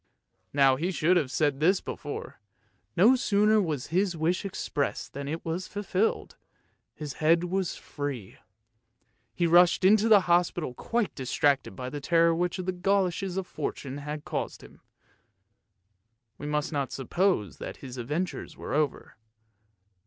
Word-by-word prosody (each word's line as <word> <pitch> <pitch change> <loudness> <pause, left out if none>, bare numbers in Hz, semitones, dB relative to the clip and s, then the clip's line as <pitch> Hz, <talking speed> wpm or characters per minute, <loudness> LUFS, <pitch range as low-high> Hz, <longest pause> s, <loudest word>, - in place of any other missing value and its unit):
Now 135 -2 +4
he 170 +6 -1
should 175 0 +2
have 155 -7 +1
said 145 0 0
this 180 +5 +4
before; 145 - -7 0.6
no 220 +9 +7
sooner 210 -2 +3
was 155 -8 -3
the 180 +2 +1
wish 170 +5 0
expressed 150 -6 -3
than 140 0 -5
it 160 +3 -4
was 170 +3 -3
fulfilled, 205 +1 -1 0.6
his 150 -3 -6
head 165 +2 +4
was 185 0 -1
free. 140 -9 -6 1.0
He 175 - +1
rushed 175 +2 +5
into 215 +3 +5
the 210 -3 +7
hospital 175 -5 +1
quite 230 - -1
distracted 135 +1 0
by 130 -1 -6
the 145 - -5
terror 165 +2 +4
which 175 +2 -1
the 185 0 -2
goloshes 185 0 0
of 190 - -1
Fortune 140 -4 -5
had 150 +1 -6
caused - - -4
him. - - -16 1.6
We 145 - -5
must 150 +1 -1
not 140 -2 -1
suppose 140 - 0
that - - -6
his 130 -1 -9
adventures 150 +10 -4
were - - -6
over. 150 -2 -1
165 Hz, 145 wpm, -28 LUFS, 145-185 Hz, 1.6 s, no